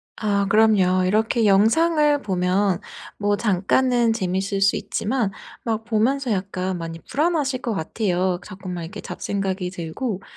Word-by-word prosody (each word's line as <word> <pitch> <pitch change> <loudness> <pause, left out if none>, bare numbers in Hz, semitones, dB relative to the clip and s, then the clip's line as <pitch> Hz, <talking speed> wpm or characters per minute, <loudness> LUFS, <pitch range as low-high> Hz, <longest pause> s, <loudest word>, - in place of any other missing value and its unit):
아 200 -2 0
그럼요. 195 -4 +4
이렇게 220 +4 +2
영상을 295 +9 +4
보면 185 0 +1 0.4
뭐 205 0 +1
잠깐은 230 +4 +2
재밌을 195 -1 -2
수 195 - +4
있지만 220 -2 -1 0.3
막 225 -1 -2
보면서 240 +3 +1
약간 185 -1 -2
많이 165 0 -6
불안하실 290 -4 0
거 230 - -2
같아요. 180 0 -1
그 - - -13
자꾸만 185 -2 -6
이렇게 195 +6 -8
잡생각이 190 -2 -3
들고. 185 +5 -4
205 Hz, 300 characters per minute, -22 LUFS, 185-230 Hz, 0.4 s, 그럼요